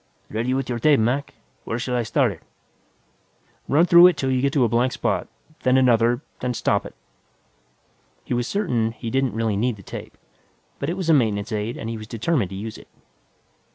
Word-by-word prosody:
"Ready 120 +4 -1
with 135 -1 -2
your 120 -1 -3
tape, 145 +3 +4
Mac. 125 +6 -1 0.3
Where 115 - -3
shall 125 +1 -2
I 120 - +1
start 130 0 +1
it?" 85 - -11 1.3
"Run 150 +4 +4
it - - +2
through 175 +1 +8
'til 135 -4 -2
you 130 -1 +1
get 140 +1 +1
to 140 - +3
a - - +4
blank 120 +3 +1
spot, - - -1 0.3
then 130 0 +3
another, 120 -1 +3 0.2
then 125 -1 -2
stop - - 0
it." - - -15 1.3
He - - -3
was 120 -1 -1
certain 120 - 0
he 115 0 -6
didn't 135 -3 0
really 110 -2 0
need 120 +3 0
the 100 - -14
tape, - - -9 0.6
but 140 - -2
it 175 - -3
was 175 -4 +1
a - - +6
maintenance 110 -5 +1
aid 110 +2 -3
and 115 - -6
he 115 -1 -4
was 110 - -9
determined 115 - -1
to 95 - -7
use 105 +3 -6
it. - - -16
120 Hz, 205 wpm, -23 LUFS, 115-135 Hz, 1.3 s, through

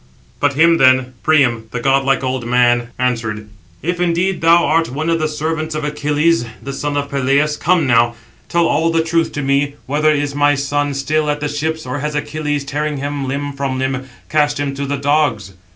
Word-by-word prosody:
But 145 0 +2
him 165 +3 +4
then 130 -1 +4
Priam, 130 -8 +2
the 125 - -4
godlike 135 +2 +2
old 130 -1 -2
man, 120 -1 +2
answered: 115 -4 -2 0.4
"If 175 +2 -2
indeed 180 +2 0
thou 170 +1 +5
art 165 +2 +2
one 155 +5 -2
of 165 - +1
the 155 - 0
servants 155 +1 -3
of 155 - -3
Achilles, 150 +1 +1 0.2
the 140 - -7
son 145 +1 -3
of 140 0 -3
Peleus, 140 +2 +1
come 170 +1 +2
now, 120 -1 +3 0.3
tell 170 0 +2
all 165 +2 +1
the 165 0 +2
truth 165 0 0
to 145 - -3
me, 140 +1 +1
whether 150 +3 +1
is 145 -1 -1
my 145 0 +3
son 145 +1 -1
still 150 +2 0
at 150 0 -1
the 150 - -2
ships, 155 +2 -3
or 130 +3 -4
has 150 +1 -3
Achilles, 145 -1 -2
tearing 150 +1 -2
him 140 0 -3
limb 140 +1 -3
from 135 -1 -3
limb, 130 0 -3 0.2
cast 145 -1 +1
him 140 -1 -2
to 140 0 -4
the 145 +1 -2
dogs?" 140 -8 0
145 Hz, 200 wpm, -17 LUFS, 135-155 Hz, 0.4 s, thou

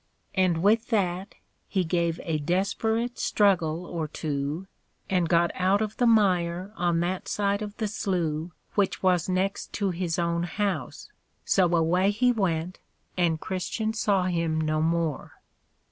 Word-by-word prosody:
And 180 -3 +2
with 220 +3 +3
that 190 -3 -1 0.3
he 190 -2 0
gave 170 -1 0
a 160 -2 -1
desperate 215 +8 -1
struggle 180 -5 +2
or 165 -3 -3
two, 150 +3 -3 0.5
and 180 -3 +2
got 170 0 +3
out 190 +2 +2
of 215 0 -3
the 245 - +3
mire 185 -3 +2
on 175 -2 +1
that 180 +2 -2
side 200 0 0
of 210 -1 -6
the 220 - -1
Slough 175 -6 -2 0.2
which 200 -2 0
was 180 -1 +2
next 190 +2 -1
to 200 -2 0
his 175 -1 -2
own 170 -1 0
house: 195 +3 -3 0.3
so 180 -3 +3
away 175 +4 +3
he 245 +5 +3
went, 180 -5 -1 0.4
and 170 -3 +1
Christian 215 +5 -2
saw 200 -4 +1
him 165 -3 0
no 155 0 0
more. 165 -2 -1
180 Hz, 145 wpm, -26 LUFS, 170-200 Hz, 0.5 s, with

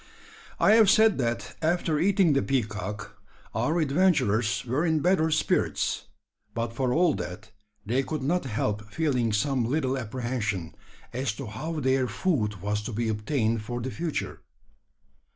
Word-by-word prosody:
I - - +5
have 220 -2 +6
said 220 -5 +5
that 120 -2 -2
after 160 -1 +1
eating 190 -4 +3
the 135 - +3
peacock 105 -4 -3 0.3
our 125 +11 +1
adventurers 135 - +2
were 130 +6 0
in 160 -2 +2
better 170 -2 +3
spirits; 155 - 0 0.5
but 115 0 -2
for 125 +1 0
all 165 +3 +3
that, 105 +2 -6 0.3
they 120 +6 +1
could 150 0 -4
not 170 +3 0
help 105 -3 -2
feeling 130 -8 +1
some 130 +4 +1
little 130 +2 0
apprehension 115 -7 -3 0.4
as 125 -2 -1
to 130 +5 -7
how 155 +8 -4
their 130 -1 +2
food 105 - -1
was 105 +1 -1
to - - -3
be 115 +1 -1
obtained 110 +1 0
for 120 +3 -4
the 130 +2 -4
future. 165 +2 -4
130 Hz, 150 wpm, -27 LUFS, 110-155 Hz, 0.5 s, have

